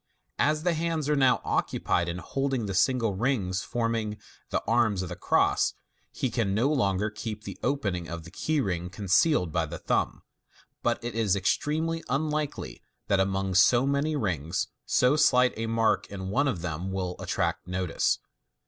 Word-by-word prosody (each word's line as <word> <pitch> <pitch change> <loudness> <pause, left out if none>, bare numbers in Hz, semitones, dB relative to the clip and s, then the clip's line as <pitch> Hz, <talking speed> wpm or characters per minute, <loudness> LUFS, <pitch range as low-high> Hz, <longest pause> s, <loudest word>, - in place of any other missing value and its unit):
As 150 +1 +2
the 175 - +2
bands 165 -2 -1
are 150 - +3
now 135 -3 +4
occupied 85 0 0
in 85 - -3
holding 135 +3 -2
the 100 - -3
single 115 +1 +2
rings 100 -4 0
forming 115 -2 -2 0.3
the - - -1
arms 110 -4 +2
of 90 - -5
the 90 - -5
cross, 90 - +2 0.4
he 130 - -2
can 100 -5 0
no 120 +6 +2
longer 105 -5 +1
keep 105 0 -6
the - - -8
opening 100 -12 -1
of 85 -1 -6
the 85 - -12
key 155 +9 -1
ring 90 -7 -2
concealed 95 - +2
by 85 -1 0
the 85 +2 -6
thumb, - - -1 0.6
but - - 0
it 120 - -4
is 110 -4 +2
extremely 160 - 0
un 150 +4 0
likely 150 -1 -3 0.3
that 100 - +3
among 95 0 0
so 120 +7 +5
many 140 +3 +1
rings, 85 - -1 0.2
so 125 +3 +4
slight 125 -4 +4
a 115 +1 -3
mark 115 -2 +1
in 95 -1 -6
one 140 +6 +2
of 90 -11 -2
them 90 +2 -3
will 90 -2 -2
attrai - - 0
t - - -29
notice. 90 -2 0
110 Hz, 175 wpm, -27 LUFS, 95-135 Hz, 0.6 s, so